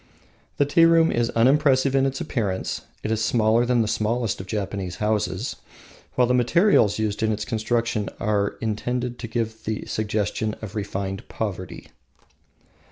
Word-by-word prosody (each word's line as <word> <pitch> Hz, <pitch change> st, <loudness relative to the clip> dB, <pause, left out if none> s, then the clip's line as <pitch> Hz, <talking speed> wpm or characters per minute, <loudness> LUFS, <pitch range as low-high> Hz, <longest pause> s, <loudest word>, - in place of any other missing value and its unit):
The 145 Hz, -, +3 dB
tea 165 Hz, +4 st, +5 dB
room 165 Hz, -1 st, +5 dB
is 120 Hz, 0 st, +1 dB
unimpressive 135 Hz, +2 st, +3 dB
in 135 Hz, 0 st, +3 dB
appearance. 115 Hz, -8 st, -2 dB, 0.2 s
It 110 Hz, -, -2 dB
is 110 Hz, 0 st, 0 dB
smaller 115 Hz, +1 st, +3 dB
than 120 Hz, -2 st, +3 dB
the -, -, -2 dB
smallest 110 Hz, 0 st, -1 dB
of 95 Hz, -, -11 dB
Japanese 100 Hz, -3 st, -3 dB
houses, 105 Hz, 0 st, -1 dB, 0.6 s
while 125 Hz, -, +4 dB
the 125 Hz, -, +1 dB
materials 125 Hz, -, +4 dB
used 110 Hz, -1 st, -1 dB
in 110 Hz, 0 st, +2 dB
its 105 Hz, 0 st, -2 dB
construction 115 Hz, -2 st, -1 dB
are 100 Hz, -1 st, 0 dB
intended 120 Hz, +3 st, -2 dB
to 120 Hz, -, -5 dB
give 110 Hz, -1 st, -3 dB
the 110 Hz, 0 st, -3 dB
suggestion 110 Hz, 0 st, -2 dB
of 110 Hz, -4 st, -8 dB
refined 95 Hz, -2 st, -4 dB
poverty. 95 Hz, -5 st, -5 dB
110 Hz, 150 wpm, -24 LUFS, 105-125 Hz, 0.6 s, tea